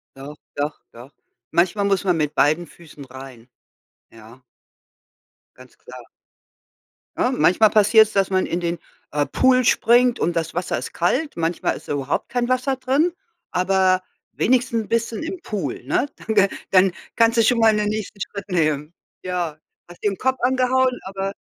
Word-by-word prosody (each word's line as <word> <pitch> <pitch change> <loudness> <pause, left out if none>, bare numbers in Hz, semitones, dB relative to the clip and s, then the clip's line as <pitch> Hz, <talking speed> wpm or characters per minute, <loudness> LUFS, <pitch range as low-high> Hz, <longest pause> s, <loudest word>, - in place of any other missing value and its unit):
Doch, 140 +2 -10 0.2
doch, 145 +1 -3
doch. 120 +4 -13 0.4
Manchmal 185 +4 +1
muss 200 0 +1
man 180 -4 +1
mit 150 -1 -2
beiden 155 +4 +2
Füßen 150 -4 -14
rein, 130 -2 -12 0.6
ja. 115 +3 -16 1.1
Ganz 130 0 -17
klar. 125 0 -12 1.2
Ne, - - +1
manchmal 185 +8 +4
passiert's, 215 +1 +5
dass 195 -2 +1
man 185 -1 +1
in 170 - -2
den, 170 0 -2 0.3
äh, 145 -1 0
Pool 255 -1 +3
springt 245 +1 +3
und 170 0 0
das 165 -1 -2
Wasser 175 +1 -2
ist - - -6
kalt. 265 - 0
Manchmal 165 +1 -1
ist - - -12
da - - -2
überhaupt 140 -1 -2
kein 245 -1 -1
Wasser 255 +2 0
drin, 275 +7 +1 0.4
aber 185 0 +2 0.3
wenigstens 235 -3 +1
bist 230 0 0
du - - -6
dann - - -5
im 365 +1 -6
Pool, 190 - -4
ne? - - 0
Dann 220 - -5
g 200 -1 +5 0.2
dann 190 0 +5 0.2
kannst 230 0 +3
du 230 - +5
schon 230 +1 +3
mal 220 -1 +5
den 210 0 0
nächsten 215 -1 -5
Schritt 200 -1 -7
nehmen. 155 -3 0 0.3
Ja, 175 -4 -3 0.3
hast 175 - -14
dir 205 - +3
'n 195 - -6
Kopf 260 0 0
angehauen, 255 0 +2
aber 195 +1 -4
195 Hz, 170 wpm, -21 LUFS, 155-230 Hz, 1.2 s, passiert's